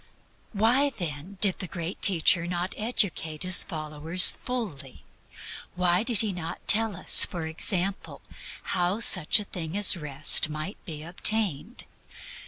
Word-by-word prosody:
Why, 240 +7 +1
then, 175 - -9
did 195 -3 +3
the 185 - -7
Great 170 +1 -8
Teacher 170 -2 +2
not 175 +1 -5
educate 190 -9 -2
His 185 0 +5
followers 155 +1 +1
fully? 175 - -8 0.7
Why 180 0 -1
did 230 -2 0
He 215 -3 -4
not 175 -2 -10
tell 220 -1 +2
us, - - +6
for 170 -3 -5
example, 185 +4 -4 0.5
how 180 +4 -2
such 185 -5 +2
a - - -7
thing 175 -2 -8
as 205 -2 +7
Rest 150 -1 +4
might 155 +6 -9
be 155 -3 -10
obtained? 195 - -1
180 Hz, 135 wpm, -24 LUFS, 160-205 Hz, 0.7 s, as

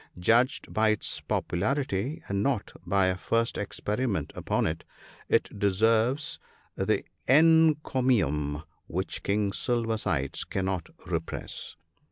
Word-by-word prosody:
Judged 120 +9 +2
by 110 0 +3
its 110 - -1
popularity 130 - -1
(and 100 0 -1
not 120 -2 -1
by 100 -1 +3
a 95 0 +1
first 115 +5 0
experiment 105 - -2
upon - - 0
it), 80 +1 -2 0.5
it - - +3
deserves 110 +8 +2 0.4
the - - 0 0.2
encomium 130 - +3 0.2
which - - -3
King 100 0 0
Silver 115 -2 0
sides 70 -10 0
cannot 95 -3 -2 0.2
repress. - - -4
110 Hz, 110 wpm, -28 LUFS, 95-130 Hz, 0.5 s, by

